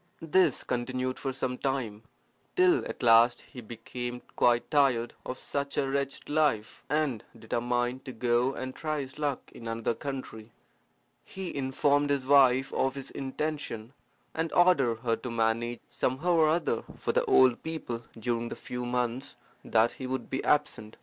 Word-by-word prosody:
This 180 +4 +3
continued 130 +1 -2
for 135 - -2
some 130 -1 -3
time, 125 -6 -2 0.5
till 365 -1 +4
at - - -7
last 115 +1 +6
he 125 - -11
became 120 +2 -6
quite 120 0 +2
tired 135 -6 +3
of 130 - -4
such 140 0 -4
a 135 - +2
wretched 140 0 -2
life, 145 -8 0
and 145 -7 0
determined 120 +3 -1
to 130 - -5
go 120 +2 +1
and 130 0 -5
try 155 0 -2
his 130 +2 -9
luck 145 -3 -2
in 115 - -9
another 115 0 -1
country. 120 -5 -7 0.7
He 190 -2 -6
informed 140 +1 +1
his 140 -2 0
wife 135 -1 +5
of 135 0 +1
his 135 -1 -6
intention, 135 -4 -4 0.4
and 160 0 -2
ordered 140 -11 +4
her 115 -2 +1
to 125 - -6
manage 115 +1 0
somehow 140 +8 0
or 160 -2 +5
other 160 -8 0
for - - -1
the - - +2
old 130 -2 +5
people 155 -8 -4 0.2
during 115 +1 -1
the - - -5
few 125 0 -5
months 125 +2 -2 0.3
that 115 +1 +3
he 130 - -7
would 130 +1 -4
be 135 - -2
absent. 110 -7 0
130 Hz, 160 wpm, -29 LUFS, 120-140 Hz, 0.7 s, last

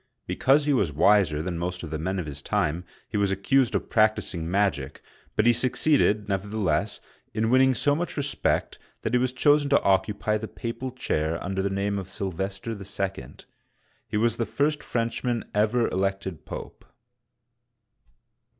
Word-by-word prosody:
Because 145 +3 +3
he 145 - +3
was 100 - +2
wiser 80 -1 +3
than 85 -1 -3
most 90 +1 -3
of - - -7
the 80 - -3
men 95 +4 -2
of 90 - -2
his 70 -1 -7
time, 90 -2 -1 0.2
he 105 - -3
was 100 -1 +2
accused 120 +7 +2
of - - -2
practicing 110 -6 +1
magic, 90 -8 0 0.3
but 105 - +2
he 120 - +6
succeeded, 125 -4 +2
never 100 0 -1
theless, 105 -2 0 0.4
in 110 +1 +1
winning 130 0 +5
so 145 +6 +2
much 165 +3 -3
respect 145 -1 -1 0.2
that - - -2
he 125 - +4
was 130 0 +1
chosen 145 +3 +3
to 140 - +4
occupy 105 +2 +1
the 110 - -5
papal 115 +4 -5
chair 80 -10 -1
under 95 +1 -2
the 100 - 0
name 100 +1 -1
of 95 -1 -7
Sylvester 95 +2 -4
II. 100 - -5 0.7
He 110 - -2
was 115 +1 +2
the 115 - -1
first 150 +1 0
Frenchman 115 0 -2
ever 110 +3 +2
elected 95 -2 -2
Pope. - - -8
105 Hz, 165 wpm, -26 LUFS, 95-120 Hz, 0.7 s, he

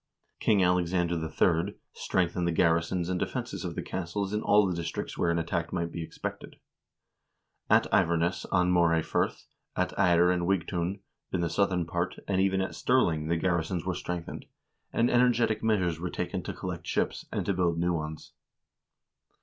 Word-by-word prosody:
King 100 -3 +3
Alexander 90 -1 +2
III. 85 +3 +1 0.2
strengthened 90 -1 0
the - - +2
garrisons 85 +1 +1
and 90 0 -1
defenses - - -3
of - - -4
the - - -3
castles 95 +3 -3
in 105 - 0
all 105 0 +4
the 90 -2 -1
dis 85 -1 -3
tricts - - -5
where 85 - +1
an 85 - +1
attack 85 0 -2
might 85 -2 -2
be 85 - -5
expected. 80 - -6 1.1
At - - +5
Iverness, 85 +1 +2
on 90 0 +3
Moray 85 -2 +3
Firth, - - -1 0.3
at - - 0
Ayr 90 -2 +5
and 90 -1 0
Wigtoun, 90 +1 -1 0.3
in 90 - 0
the 85 -1 -1
southern 90 -2 +1
part, 85 +2 -2
and 95 -1 +1
even 95 0 +2
at 95 - -3
Stirling 85 -12 +1
the 85 +1 +1
garrisons 85 0 -1
were 95 - 0
strengthened, 90 -1 -5 0.4
and 115 - +2
energetic 120 -3 +3
measures 95 -7 +1
were 90 +1 -3
taken - - -3
to - - -5
collect - - -6
ships, - - -1
and - - -2
to 100 - +1
build 85 -2 +1
new 85 +1 +1
ones. 80 -1 -5
90 Hz, 175 wpm, -29 LUFS, 85-95 Hz, 1.1 s, At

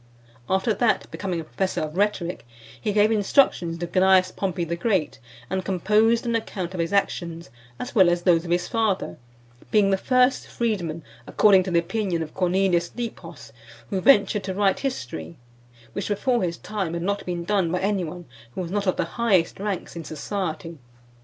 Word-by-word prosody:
After 190 +4 +2
that, 220 +2 +1
becoming 185 -4 -3
a - - -4
professor 190 +4 -2
of 155 +1 -4
rhetoric, 190 -3 -1 0.4
he 210 - 0
gave 210 +1 +3
instructions 200 - +2
to 175 - -3
Cneius 185 +1 +4
Pompey 185 -3 -2
the 170 0 -2
Great, 185 -3 0 0.3
and 190 +5 -2
composed 215 +6 +2
an 235 - 0
account 190 -5 -3
of 185 - -5
his 170 0 -1
actions, 170 -5 -1 0.3
as 250 - -5
well 190 -6 +6
as 175 0 +1
of - - -22
those 170 -3 +4
of 175 - -8
his 175 +1 +1
father, 215 - -1 0.5
being 205 -2 +3
the 195 - +3
first 255 +5 +2
freedman, 175 -9 -2 0.2
according 200 -3 +5
to 185 - -4
the 175 - +2
opinion 175 -1 -1
of 155 - -10
Cornelius 180 -1 +1
Nepos, 170 - -7 0.4
who 190 - 0
ventured 205 -4 +4
to 190 -1 -3
write 195 -1 +2
history, 120 - -5 0.6
which 200 - -3
before 235 +4 +1
his 170 -2 -2
time 195 -6 -4
had 170 - -3
not 200 +1 -1
been 175 -1 -3
done 190 -2 +1
by 180 - 0
any 195 -1 0
one 175 +2 -7 0.3
who - - -2
was 175 -1 -5
not 205 0 -1
of 185 - +2
the 180 - 0
highest 190 -3 +1
ranks 200 -3 -4
in 170 - -6
society. 165 -1 -4
190 Hz, 185 wpm, -24 LUFS, 170-205 Hz, 0.6 s, well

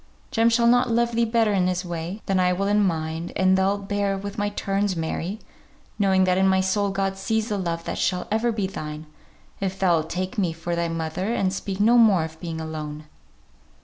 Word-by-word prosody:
Jem 225 +1 +3
shall 235 0 +3
not 245 +1 +4
love 235 +1 +2
thee 235 0 +2
better 225 -2 +2
in 185 -2 +2
his 180 0 -1
way, 175 +4 -5
than 195 -1 +1
I 180 0 +3
will 195 +2 -1
in 205 +1 +3
mine; 160 -2 -2
and 185 0 +4
thou'lt 195 +1 0
bear 200 -1 0
with 200 +1 -6
my 205 -2 -1
turns, 200 -1 -1
Mary, 165 +4 -3 0.6
knowing 190 -2 +3
that 185 0 +2
in 190 - +4
my 190 0 +3
soul 200 +2 +1
God 195 0 -1
sees 220 +3 -1
the 205 - -1
love 170 -2 -3
that - - -4
shall 180 - 0
ever 225 +2 +1
be 215 -3 -1
thine, 155 -4 -6 0.5
if 195 -1 -2
thou'lt 170 -4 +2
take 185 +3 -3
me 175 -4 +1
for 165 +1 -4
thy 170 0 0
mother, 165 +5 -3
and 190 -1 0
speak 195 0 -4
no 235 +4 +5
more 205 -7 +5
of 160 0 -8
being 165 -1 -5
alone." 155 -1 -6
190 Hz, 215 wpm, -24 LUFS, 170-205 Hz, 0.6 s, no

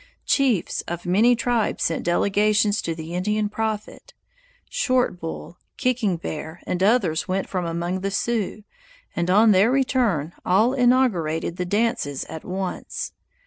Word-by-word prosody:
Chiefs 270 - +1
of 175 0 -5
many 215 +8 +4
tribes 235 -2 0
sent 165 - -1
delegations 205 +4 +2
to 165 - -3
the 160 +1 -7
Indian 210 +4 0
prophet; 215 0 -4 0.5
Short 255 - 0
Bull, 165 +1 -7 0.2
Kicking 240 -8 +1
Bear, 160 0 -6
and 180 - -2
others 195 -6 +2
went 190 +1 -1
from 180 -3 -2
among 170 +2 -2
the 195 +1 -2
Sioux, 215 0 -2 0.5
and 170 +1 -1
on 215 +4 +6
their 200 +3 +5
return 245 - +1
all 215 +8 +3
inaugurated 225 - +1
the 180 - -2
dances 200 - 0
at 160 -1 -8
once. 190 0 -4
195 Hz, 140 wpm, -23 LUFS, 175-230 Hz, 0.5 s, on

